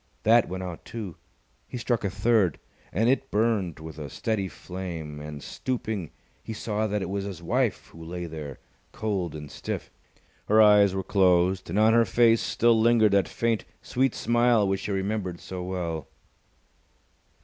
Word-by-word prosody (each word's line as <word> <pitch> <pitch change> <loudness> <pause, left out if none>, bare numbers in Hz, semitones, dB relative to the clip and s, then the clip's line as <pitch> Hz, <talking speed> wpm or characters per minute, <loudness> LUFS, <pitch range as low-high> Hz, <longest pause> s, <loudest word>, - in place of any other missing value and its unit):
That 115 +1 +5
went 95 +1 -4
out, 90 -3 -7
too. 105 -8 -7 0.5
He - - -6
struck 120 -1 -1
a 100 - 0
third, 100 -3 +2 0.3
and 110 +6 +1
it 135 +1 +1
burnt 105 -7 0
with 80 0 -9
a 75 -2 -6
steady 110 - -2
flame; 85 -6 -7
and, 75 -1 -8
stooping, 110 -9 -3 0.3
he 110 - -6
saw 110 0 -2
that 105 -1 -1
it - - -3
was 100 0 -2
his 95 -4 -7
wife 120 +3 0
who 80 - -12
lay 90 +1 -5
there, 75 -4 -7 0.4
cold 95 -7 -2
and 75 -2 -8
stiff. - - -5 0.6
Her 110 +1 +4
eyes 105 -2 +6
were 95 - -1
closed, 95 -2 +2
and 90 - -2
on 110 +1 +5
her 115 0 +6
face 115 +3 +4
still 115 -1 +3
lingered 115 -2 +5
that 100 -1 +3
faint, 115 -2 -1 0.2
sweet 130 0 0
smile 120 -2 +3
which 95 +1 -1
he - - -2
remembered 95 -2 -2
so 95 -1 -7
well. 85 -5 -3
100 Hz, 170 wpm, -26 LUFS, 90-110 Hz, 0.6 s, eyes